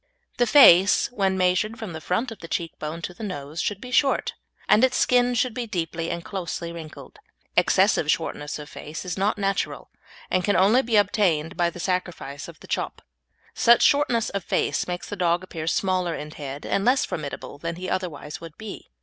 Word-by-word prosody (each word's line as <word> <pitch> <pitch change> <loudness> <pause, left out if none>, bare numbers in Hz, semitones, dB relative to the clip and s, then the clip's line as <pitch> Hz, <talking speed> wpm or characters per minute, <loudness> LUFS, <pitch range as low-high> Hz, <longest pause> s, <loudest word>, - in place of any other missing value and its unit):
The 245 -1 +3
face, 200 - +7
when 195 -5 0
measured 185 +5 +1
from 220 -6 -6
the 160 - -7
front 220 +10 -1
of 220 - -9
the 165 - -9
cheek 165 -1 -2
bone 160 +2 -5
to 180 - -4
the 175 - -13
nose, 155 -6 -5
should 205 -2 -2
be 250 +3 -9
short, 270 +2 +2 0.3
and 215 - +5
its 260 -1 +3
skin 245 0 +3
should 245 0 +1
be 240 0 -4
deeply 165 -3 -3
and 170 - -4
closely 170 -3 -4
wrinkled. 165 -2 -10 0.4
Excessive - - +3
shortness 145 0 -1
of 150 -1 -9
face 155 +5 -8
is 180 - -3
not 200 +3 0
natural, 195 -1 -2 0.4
and 185 - +2
can 205 +1 +2
only 210 +7 +5
be 235 -3 -1
obtained 185 -5 +2
by 175 -1 +2
the 175 - -11
sacrifice 175 -6 -3
of - - -12
the - - -13
"chop." - - -3 0.5
Such 235 0 +5
shortness 280 -6 +3
of 200 -2 -3
face - - 0
makes 180 0 -4
the 205 - -5
dog 175 -1 +1
appear 160 -4 -6
smaller 185 -1 0
in 150 0 -7
head 145 -2 -7
and 195 - 0
less 255 +4 +3
formidable 145 -2 -6
than 170 +2 -4
he 185 +2 -6
otherwise 155 -5 -4
would 165 -2 -10
be. 220 -2 -9
185 Hz, 200 wpm, -24 LUFS, 165-215 Hz, 0.5 s, face